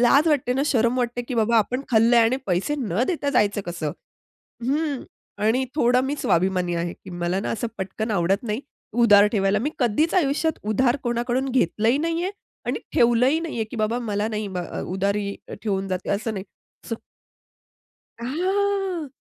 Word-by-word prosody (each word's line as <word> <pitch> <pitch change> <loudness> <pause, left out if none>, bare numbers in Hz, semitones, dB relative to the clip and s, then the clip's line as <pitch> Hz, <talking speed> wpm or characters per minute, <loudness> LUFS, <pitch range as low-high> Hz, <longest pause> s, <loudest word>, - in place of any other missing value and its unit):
लाज 280 +6 +5
वाटते 265 -5 +2
ना, 265 +2 +1
शरम 235 -2 +2
वाटते 245 0 -1
की 250 +1 -5
बाबा, 230 0 +3
आपण 245 +4 0
खाल्लंय 235 +1 +5
आणि 230 +3 +3
पैसे 185 +11 0
न 225 -3 0
देता 300 -5 -1
जायचं 205 -5 +2
कसं? 170 -4 -3 0.7
हं, 285 +1 0 0.4
आणि 250 +4 +3
थोडा 250 -3 +3
मी 275 +3 -2
स्वाभिमानी 180 0 +1
आहे, 170 0 -2
की 185 - -13
मला 175 +2 -1
ना, - - -3
असं 235 +1 -2
पटकन 215 +4 -3
आवडत 195 0 +1
नाही, 220 +1 -2 0.3
उधार 210 -3 +6
ठेवायला. 195 -1 +2
मी 280 +7 -1
कधीच 255 +6 +2
आयुष्यात 320 -2 +1
उधार 240 +4 +3
कोणाकडून 240 +2 0
घेतलंही 230 +1 +2
नाहीये 335 +4 -1 0.4
आणि - - -1 0.2
ठेवलंही 245 +6 +4
नाहीये, 305 -9 -3
की 220 +3 -9
बाबा, 220 +2 0
मला 210 -3 -1
नाही 215 -2 -3
ब 185 -2 -4 0.3
उधारी 200 +1 -1 0.2
ठेवून 195 -2 -2
जाते 185 0 -3
असं 220 +3 -1
नाही. 190 -1 -5 0.5
स - - -2 1.3
हां, 375 +5 -1
235 Hz, 160 wpm, -24 LUFS, 205-270 Hz, 1.3 s, उधार